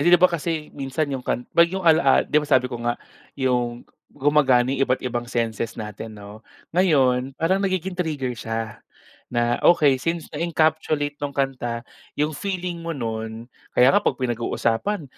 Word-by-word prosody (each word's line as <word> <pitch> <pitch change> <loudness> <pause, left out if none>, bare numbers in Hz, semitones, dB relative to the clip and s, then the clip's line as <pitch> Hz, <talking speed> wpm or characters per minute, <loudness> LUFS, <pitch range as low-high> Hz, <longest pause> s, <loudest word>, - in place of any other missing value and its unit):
'di 175 +4 +6
ba 180 0 +4
kasi 160 -1 -3
minsan 140 +1 -2
yung 130 - -2
kan 125 0 -2
'pag 170 0 +5
yung 190 +1 -4
alaal 160 -4 +5
'di 150 - +2
ba 150 - -7
sabi 130 -2 +3
ko 120 - -4
nga 120 0 -1 0.4
yung 125 -2 -1 0.2
gumagana 135 -3 +3
yung 135 - -2
iba't-ibang 120 -2 -1
senses 115 -2 -2
natin, 110 0 -7
'no. 105 +1 -11 0.3
Ngayon 135 -7 +2
parang 185 +4 +1
nagiging 190 -1 -1
trigger 155 -8 -2
siya, 115 -1 -5 0.5
na 120 0 0
okey 145 -6 +5
since 165 +1 -2
na-encapsulate 155 -2 0
nung 145 -1 -4
kanta 125 -4 -2 0.3
yung 150 +2 0
feeling 180 -1 -4
mo 165 -2 -4
nun, 110 -1 -4 0.3
kaya 125 +2 +6
nga - - +4
'pag - - 0
pinag-uusapan, 120 - -1
135 Hz, 160 wpm, -23 LUFS, 120-160 Hz, 0.5 s, di